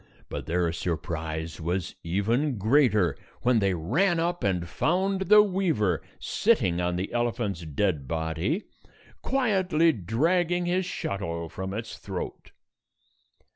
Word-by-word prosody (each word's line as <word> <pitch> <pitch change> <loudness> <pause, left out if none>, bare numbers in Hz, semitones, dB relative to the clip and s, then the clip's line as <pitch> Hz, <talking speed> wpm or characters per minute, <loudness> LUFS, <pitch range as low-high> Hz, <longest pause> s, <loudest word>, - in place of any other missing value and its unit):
But - - -5
their 85 0 +1
surprise 80 -1 -3
was 85 +2 -2
even 115 - 0
greater, 105 - +3 0.3
when 125 -2 +4
they 100 -3 +1
ran 165 - +1
up 175 +1 -1
and 90 -4 0
found 190 - 0
the 210 0 +9
weaver 165 - +1 0.2
sitting 100 - +2
on 90 0 0
the 95 +5 -3
elephant's 120 -6 -1
dead 75 -2 0
body, 80 - -1 0.6
quietly 185 -11 +2
dragging 165 - +1
his 180 +1 0
shuttle 85 - -3
from 95 +3 -5
its 110 +2 -6
throat. 95 -3 -6
105 Hz, 120 wpm, -27 LUFS, -, 0.6 s, the